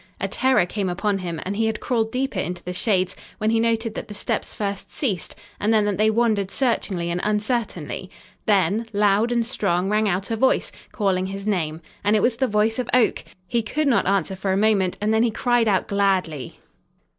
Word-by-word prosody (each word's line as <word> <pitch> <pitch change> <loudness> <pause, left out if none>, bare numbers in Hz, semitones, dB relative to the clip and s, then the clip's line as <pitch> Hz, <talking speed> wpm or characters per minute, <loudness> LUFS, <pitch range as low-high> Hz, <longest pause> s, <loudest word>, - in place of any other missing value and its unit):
A - - -1
terror 260 -8 +2
came 195 +1 -2
upon 195 +2 0
him 170 -3 -4
and 195 +2 -2
he 220 +1 +1
had 220 -1 -2
crawled 225 -3 0
deeper 255 -5 -1
into 180 -1 -4
the 180 - -4
shades, 185 -1 +1 0.2
when 215 +1 +1
he 225 - +2
noted 225 -1 +1
that - - -6
the 210 - -8
steps - - -3
first 200 -2 -4
ceased, 205 - -2 0.2
and 210 - +1
then 215 -2 +4
that 205 -2 -1
they 215 +1 +4
wandered 220 -4 +1
searchingly 195 -9 -1
and 175 +1 -1
uncertainly. 210 - -2 0.4
Then, 210 +2 +2
loud 205 +3 +3
and 235 -1 +1
strong, 195 -6 0
rang 215 0 +2
out 190 +4 -2
a - - +1
voice, 260 +4 +2 0.2
calling 190 -4 0
his 195 +1 -6
name, 165 -6 -1 0.2
and 205 +1 +3
it 210 - +2
was 240 -1 +2
the 265 - +1
voice 215 +2 +1
of 250 - -2
Oak! 250 -3 +2 0.2
He 235 +3 +1
could 290 +8 -1
not 250 -8 +3
answer 195 -1 +1
for 190 +1 -2
a 190 - +2
moment, 200 -3 +2
and 215 +1 +1
then 220 - +3
he 235 - +3
cried 240 +1 +1
out 195 -3 +2
gladly. 190 - 0
210 Hz, 210 wpm, -23 LUFS, 190-225 Hz, 0.4 s, then